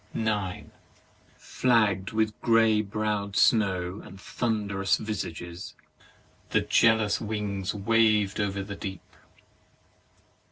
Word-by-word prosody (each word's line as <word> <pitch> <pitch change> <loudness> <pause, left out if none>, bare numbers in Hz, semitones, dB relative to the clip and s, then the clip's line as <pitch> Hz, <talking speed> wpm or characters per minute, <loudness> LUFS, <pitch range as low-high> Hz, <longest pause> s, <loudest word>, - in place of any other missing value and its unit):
9. 105 -5 -2 0.7
Flagg'd 105 -6 +1
with 110 -1 0
grey 115 -2 +4
browM 105 -1 -3
snows 95 -5 +2
and 95 - -12
thunderous 100 -3 -1
visages, 85 -5 -6 0.7
the - - +2
jealous 110 -2 +3
wings 105 -3 -3
wavM 105 -1 +2
over 100 -1 -1
the 100 +1 -7
deep. 95 -3 -6
105 Hz, 90 wpm, -27 LUFS, 95-110 Hz, 0.7 s, grey